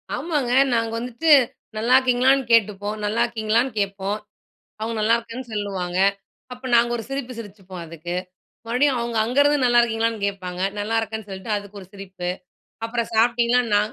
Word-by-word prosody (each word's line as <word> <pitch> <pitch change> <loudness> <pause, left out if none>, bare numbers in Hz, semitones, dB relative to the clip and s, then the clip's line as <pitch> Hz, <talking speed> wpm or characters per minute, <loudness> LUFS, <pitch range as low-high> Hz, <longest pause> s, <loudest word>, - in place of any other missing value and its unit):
ஆமாங்க. 295 -7 -1 0.2
நாங்க 230 -1 0
வந்துட்டு, 250 +7 0 0.5
நல்லா 235 +4 +3
இருக்கீங்களான்னு 260 +1 +3
கேட்டுப்போம். 210 -2 +2
நல்லா 215 +3 0
இருக்கீங்களான்னு 230 +2 0
கேட்போம். 200 0 -2 0.6
அவுங்க 225 +1 -3
நல்லா 225 +2 +4
இருக்கேன்னு 235 +2 -8
சொல்லுவாங்க. 190 -4 -2 0.5
அப்ப 250 +1 -7
நாங்க 235 0 +4
ஒரு 225 - -6
சிரிப்பு 270 -2 -4
சிரிச்சுப்போம், 195 -5 -9
அதுக்கு. 170 +2 -6 0.5
மறுபடியும் 255 +3 +2
அவுங்க 235 -1 -2
அங்கருந்து 285 +5 +3
நல்லா 240 -1 +5
இருக்கீங்களான்னு 225 -2 -1
கேட்பாங்க. 185 -2 -5 0.2
நல்லா 215 +2 -1
இருக்கேன்னு 220 -1 -5
சொல்ட்டு, 190 +3 -6
அதுக்கு 200 0 -9
ஒரு 185 - -13
சிரிப்பு. 190 -3 -6 0.6
அப்புறம் 235 0 -3
சாப்டீங்களா 235 +1 +3
நான் 210 +2 +2
225 Hz, 145 wpm, -23 LUFS, 200-245 Hz, 0.6 s, நல்லா